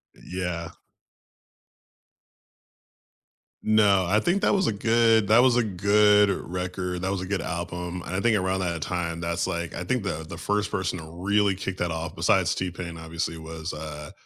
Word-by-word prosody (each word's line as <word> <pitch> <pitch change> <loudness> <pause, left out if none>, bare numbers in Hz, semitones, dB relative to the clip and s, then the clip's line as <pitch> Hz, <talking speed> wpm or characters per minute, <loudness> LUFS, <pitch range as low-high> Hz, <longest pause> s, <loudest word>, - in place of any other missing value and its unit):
Yeah. 90 -2 -4 2.9
No, 105 -3 +4
I 105 +4 +3
think 180 - +1
that - - +4
was 195 -2 +2
a - - +2
good 115 0 +3
that 110 +4 +6
was 125 -2 +4
a 120 - +3
good 105 +1 +4
record 90 -1 -3
that 95 +1 -1
was 100 - -1
a 90 - -4
good 100 +1 -2
album, 90 +1 -4
and 90 - -4
I 95 - 0
think 115 -1 +3
around 95 0 0
that 85 -3 -2
time, 85 -1 -2
that's 85 +1 -1
like 85 -2 -3
I 90 - -4
think 120 +5 -1
the 80 -5 -3
the 80 +1 -8
first 105 +4 -1
person 95 -1 -1
to - - -8
really 95 +5 +1
kick 95 0 -4
that 85 -1 -1
off, 80 -1 -4
besides - - +2
T-Pain 90 -2 -4
obviously, 80 0 -4
was, 80 +1 -6
uh, 75 -1 -7
90 Hz, 175 wpm, -26 LUFS, 85-105 Hz, 2.9 s, that